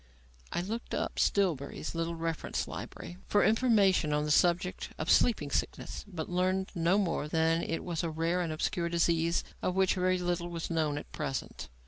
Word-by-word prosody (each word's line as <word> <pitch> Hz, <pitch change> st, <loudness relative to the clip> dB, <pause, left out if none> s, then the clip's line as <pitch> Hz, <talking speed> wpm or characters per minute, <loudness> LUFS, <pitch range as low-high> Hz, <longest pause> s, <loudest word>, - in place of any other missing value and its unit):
I -, -, -1 dB
looked 225 Hz, +6 st, -4 dB
up -, -, -2 dB
Stillbury's 160 Hz, -7 st, 0 dB
little 165 Hz, 0 st, -2 dB
reference 165 Hz, -1 st, -2 dB
library 175 Hz, -, -7 dB
for 205 Hz, -, +3 dB
information 210 Hz, -8 st, +3 dB
on 150 Hz, 0 st, +1 dB
the 150 Hz, -, -1 dB
subject 175 Hz, +3 st, +2 dB
of -, -, 0 dB
sleeping 150 Hz, -12 st, +3 dB
sickness, -, -, -3 dB
but 170 Hz, -6 st, -5 dB
learned 185 Hz, +1 st, 0 dB
no 170 Hz, +3 st, +2 dB
more 170 Hz, -7 st, 0 dB
than 165 Hz, +1 st, +2 dB
that -, -, -5 dB
it 165 Hz, -, -2 dB
was 170 Hz, -3 st, -2 dB
"a 165 Hz, -, -1 dB
rare 165 Hz, +3 st, 0 dB
and 170 Hz, -2 st, -2 dB
obscure 170 Hz, +2 st, -1 dB
disease 170 Hz, 0 st, +2 dB, 0.2 s
of 185 Hz, -, -1 dB
which 190 Hz, -1 st, +3 dB
very 185 Hz, 0 st, +1 dB
little 175 Hz, -1 st, -1 dB
was 170 Hz, 0 st, -4 dB
known 155 Hz, -3 st, 0 dB
at -, -, -8 dB
present." 120 Hz, -, -4 dB
170 Hz, 180 wpm, -31 LUFS, 160-185 Hz, 0.2 s, for